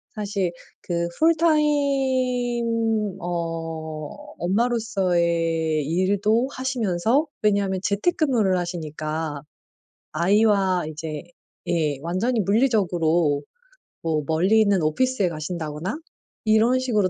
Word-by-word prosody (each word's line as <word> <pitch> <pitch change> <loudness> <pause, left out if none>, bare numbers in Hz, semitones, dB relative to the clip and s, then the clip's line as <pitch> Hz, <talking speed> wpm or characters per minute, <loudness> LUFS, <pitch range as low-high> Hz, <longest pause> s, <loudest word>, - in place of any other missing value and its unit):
사실 200 -4 -2 0.3
그 170 -1 -2
full 330 +1 +4
time 250 - +1
어 165 -3 -4 0.3
엄마로서의 175 - +1
일도 200 - +1
하시면서 250 - 0 0.2
왜냐하면 200 -2 +2
재택근무를 220 - +1
하시니까 155 -3 -4 0.7
아이와 190 +1 +3
이제 155 0 -6 0.4
예 150 -5 0
완전히 200 +9 0
물리적으로 175 - +2 0.6
뭐 155 -2 -1
멀리 185 +8 +3
있는 200 -4 +3
오피스에 205 +4 +1
가신다거나 160 - -4 0.5
이런 225 +4 +4
식으로 215 -7 +1
190 Hz, 240 characters per minute, -23 LUFS, 165-230 Hz, 0.7 s, full